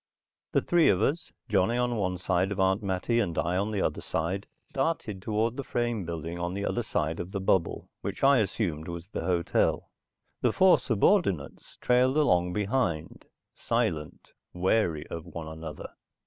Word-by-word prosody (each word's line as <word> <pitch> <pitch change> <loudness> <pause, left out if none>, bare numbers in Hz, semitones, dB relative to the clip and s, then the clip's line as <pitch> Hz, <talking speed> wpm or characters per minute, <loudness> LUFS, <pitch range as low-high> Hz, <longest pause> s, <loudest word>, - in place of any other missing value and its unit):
The - - +3
three 175 -2 +4
of 95 - +3
us, 145 +10 0 0.2
Johnny 110 +2 +2
on 125 -1 +1
one 95 -4 -1
side 95 +2 0
of 100 - -3
Aunt 95 +2 +2
Mattie 100 +4 0
and 90 -8 -1
I 85 +2 0
on 100 +3 0
the 105 -3 -1
other - - -1
side, 90 +5 -2 0.2
started 135 - -2
toward 110 +3 0
the 140 - -3
frame 120 -6 -1
building 85 +1 -5
on 85 +1 -2
the 100 0 -2
other 120 - 0
side 80 -7 -2
of 90 +2 -5
the 100 - -2
bubble, 95 -2 0
which 100 +5 -5
I 135 -1 +6
assumed 90 -6 -1
was 85 +1 -7
the - - -4
hotel. 85 -2 +1 0.5
The - - +2
four 190 -1 +6
subordinates 110 - +1
trailed 125 +3 +3
along 90 -12 +3
behind, 100 -6 -1 0.3
silent, 75 -2 -2 0.2
wary 90 -4 +1
of 85 -1 -6
one 85 -2 -7
another. 80 -1 -7
95 Hz, 170 wpm, -28 LUFS, 85-115 Hz, 0.5 s, I